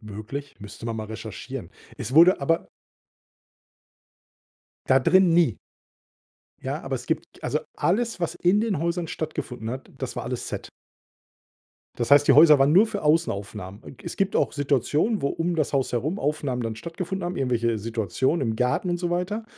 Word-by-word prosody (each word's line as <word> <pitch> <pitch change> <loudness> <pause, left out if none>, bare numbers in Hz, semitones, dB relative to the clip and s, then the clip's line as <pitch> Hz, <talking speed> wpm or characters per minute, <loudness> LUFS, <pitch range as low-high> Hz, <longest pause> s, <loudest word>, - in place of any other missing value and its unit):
Möglich. 110 +7 -7
Müsste 105 +2 -11
man 115 -1 -3
mal 110 - -4
recherchieren. 110 -1 -7 0.3
Es 120 - -5
wurde 170 +5 +6
aber 165 +4 0 2.2
Da 130 +1 +5
drin 185 +6 +5
nie. 160 - +3 1.1
Ja, - - -3
aber - - -3
es - - -9
gibt - - -4
also, - - 0 0.2
alles, 230 +5 0
was 170 - -1
in 185 +4 +2
den 215 -8 0
Häusern 170 +1 -2
stattgefunden 125 -7 -5
hat, 130 +1 -7
das - - -5
war - - -4
alles - - -4
Set. - - -6 1.3
Das 120 +1 -2
heißt, 145 0 +6
die - - +8
Häuser 150 0 +8
waren 135 +2 +4
nur 195 +7 +6
für 210 -4 -5
Außenaufnahmen. 105 - -1
Äh, - - -10
es - - -6
gibt 195 0 0
auch - - +1
Situationen, 145 - 0
wo 140 - +2
um 170 +2 -2
das 155 - 0
Haus 135 -3 0
herum 150 - -1
Aufnahmen 145 -6 -1
dann 115 -1 -4
stattgefunden 175 - -5
haben, 175 +1 -3
irgendwelche 120 -5 0
Situationen 115 - -1
im 110 - -3
Garten 125 +9 0
und 175 - -1
so 175 -1 -2
weiter. 185 +6 -2
145 Hz, 170 wpm, -25 LUFS, 120-175 Hz, 2.2 s, die